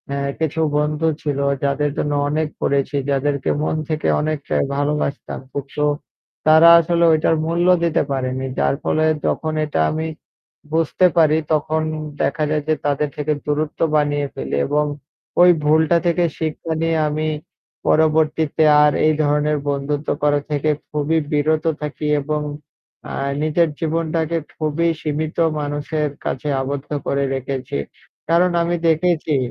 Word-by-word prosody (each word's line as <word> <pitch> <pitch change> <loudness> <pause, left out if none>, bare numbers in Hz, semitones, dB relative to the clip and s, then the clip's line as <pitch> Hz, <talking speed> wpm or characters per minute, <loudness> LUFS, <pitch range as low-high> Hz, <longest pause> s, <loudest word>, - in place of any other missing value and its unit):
এ - - -2 0.2
কিছু 160 0 -1 0.2
বন্ধু 150 +2 0
ছিল 145 -2 -2 0.2
যাদের 140 +1 0
জন্য 145 - -1 0.2
অনেক 155 +1 0
করেছি, 140 +1 0
যাদেরকে 140 0 0
মন 155 - 0
থেকে 155 -1 -1
অনেকটাই 155 -2 -1
ভালোবাসতাম। 145 0 -2
কিন্তু 140 +1 -3 0.6
তারা 160 +2 +8
আসলে 170 +1 +1
ওইটার 160 +1 +3
মূল্য 170 +2 +1 0.2
দিতে 170 -1 +2
পারেনি। 130 -1 -2
যার - - +2
ফলে 155 0 +1 0.2
যখন 155 -1 -1
এটা 150 - -2
আমি 160 +1 -2 0.7
বুঝতে 165 +3 +2
পারি 155 -1 +5 0.2
তখন 155 +1 0 0.4
দেখা 155 +2 0
যায় 155 -1 0
যে 155 - +3
তাদের 145 +1 0
থেকে 150 +1 0
দূরত্ব 150 +1 -2 0.2
বানিয়ে 145 -1 +1
ফেলি 65 +1 -3
এবং 150 +1 +1 0.6
ওই 180 - +8 0.2
ভুলটা 160 +2 +4
থেকে 175 +1 +2 0.2
শিক্ষা 160 +1 -3
নিয়ে 165 0 +1
আমি 155 +1 -2 0.6
পরবর্তীতে 155 0 +2 0.2
আর 150 - +5
এই 155 - +4
ধরনের 150 +1 +1
বন্ধুত্ব 145 +1 -2
করা 145 0 +3
থেকে 150 +1 0 0.2
খুবই 150 +2 0
বিরত 155 +2 +1 0.2
থাকি 150 0 -5 0.2
এবং 150 +1 -2 0.7
আ - - -6 0.3
নিজের 155 +2 +2
জীবনটাকে 165 0 -1 0.2
খুবই 155 +2 0
সীমিত 155 +1 -3 0.2
মানুষের 145 +1 -2 0.2
কাছে 130 +3 -3
আবদ্ধ 140 +1 -4 0.2
করে 140 0 +1
রেখেছি। 135 - -4 0.5
কারণ 175 +2 +4
আমি 170 +1 0
দেখেছি 160 -1 +1
150 Hz, 135 wpm, -20 LUFS, 145-160 Hz, 0.7 s, তারা